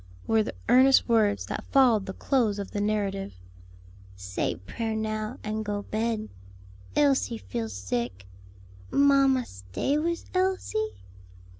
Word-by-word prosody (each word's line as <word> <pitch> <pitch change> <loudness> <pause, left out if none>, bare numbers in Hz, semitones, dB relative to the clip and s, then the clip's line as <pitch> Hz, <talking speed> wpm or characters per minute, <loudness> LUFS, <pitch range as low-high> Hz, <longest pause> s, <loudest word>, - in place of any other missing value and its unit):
were 225 -1 +3
the 215 - -4
earnest 260 +2 +6
words 215 -4 +2
that - - -5
followed 240 -7 +4
the 190 - -4
close 230 -6 +1
of 200 -1 -5
the 205 - -2
narrative. 200 - -1 0.8
"Say 95 0 -2
prayer 220 - -4
now, 215 0 -3
and 215 0 -2
go 205 -1 -3
bed. 220 0 -2 0.7
Elsie 275 -5 +2
feel 115 - -4
sick. 95 0 -4 0.6
Mamma, 275 -2 +4
stay 95 - -2
wis 335 +2 -2
Elsie?" 380 +4 -1
220 Hz, 125 wpm, -27 LUFS, 195-265 Hz, 0.8 s, earnest